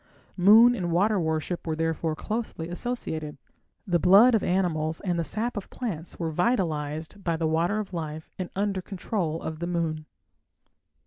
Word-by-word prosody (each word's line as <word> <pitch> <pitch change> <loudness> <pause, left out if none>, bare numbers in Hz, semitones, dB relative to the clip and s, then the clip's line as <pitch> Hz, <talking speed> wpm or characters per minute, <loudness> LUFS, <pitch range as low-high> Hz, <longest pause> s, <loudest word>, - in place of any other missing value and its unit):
Moon 220 +6 +7
and 180 -7 -2
water 200 +4 +2
worship 160 +1 -2
were 160 - 0
therefore 165 0 -1
closely 215 -5 -4
associated; 175 - -4 0.5
the 175 -4 +2
blood 200 +9 +7
of 220 - +3
animals 160 -4 0
and 175 -3 -1
the - - +1
sap 225 - -2
of 205 - -5
plants 180 -10 -5
were 165 -2 -2
vitalized 160 -2 -1
by 170 -2 0
the 160 - -1
water 165 +6 +1
of 210 -3 -4
life 155 -2 -5
and 185 - -3
under 195 -1 -1
control 180 -4 -3
of 160 -1 -5
the 170 - -3
moon. 160 -3 -2
175 Hz, 165 wpm, -26 LUFS, 160-205 Hz, 0.5 s, Moon